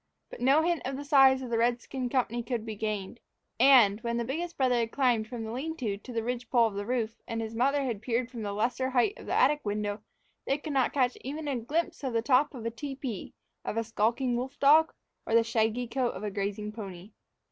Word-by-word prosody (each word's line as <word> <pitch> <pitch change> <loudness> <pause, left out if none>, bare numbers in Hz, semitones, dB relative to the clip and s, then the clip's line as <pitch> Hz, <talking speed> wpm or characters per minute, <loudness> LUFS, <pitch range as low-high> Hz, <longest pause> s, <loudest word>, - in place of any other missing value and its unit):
But - - -9
no 275 +5 +4
hint 340 -1 +1
of 265 +1 -3
the 285 - -6
size 265 -2 +5
of 245 - -6
the 230 - +1
redskin 245 +2 -1
company 240 -2 0
could 235 -1 -3
be 220 - -4
gained; 210 +1 -4 0.4
and, 235 -5 +6
when 235 -1 -2
the 235 - -1
biggest 335 +7 -4
brother 255 -3 +2
had 230 -1 -1
climbed 245 -5 +1
from 240 -1 -6
the 220 - -5
lean 315 +7 -4
to 220 -8 -2
to 210 +5 -11
the 230 -2 -2
ridge 245 +1 -4
pole 240 -3 +4
of 220 - -1
the 200 +1 -4
roof 230 -3 -2
and 230 - -3
his 225 0 -4
mother 275 +5 +2
had 235 -6 -3
peered 240 +1 -1
from 235 -3 -6
the 205 -1 -3
lesser 245 +5 -1
height 260 +9 +2
of - - -11
the - - -2
attic 295 +1 +4
window, 205 0 -2 0.5
they 275 - +2
could 300 0 -6
not 265 +1 +1 0.3
even 300 +4 -5
catch 270 -5 -2
a - - -16
glimpse 325 +2 -2
of 260 -3 -2
the 230 -1 +1
top 275 +3 +3
of 230 -3 -7
a 230 - -1
tepee, 265 -4 -6 0.3
of 215 - -4
a 230 - +1
skulking 230 +3 0
wolf 260 +3 -4
dog, 310 +3 +6 0.4
or - - -2
of - - +7
the 230 - +4
shaggy 225 +2 0
coat 250 0 -1
of - - -7
a 210 - -2
grazing 205 +1 -3
pony. 200 -2 -9
240 Hz, 245 wpm, -29 LUFS, 225-270 Hz, 0.5 s, of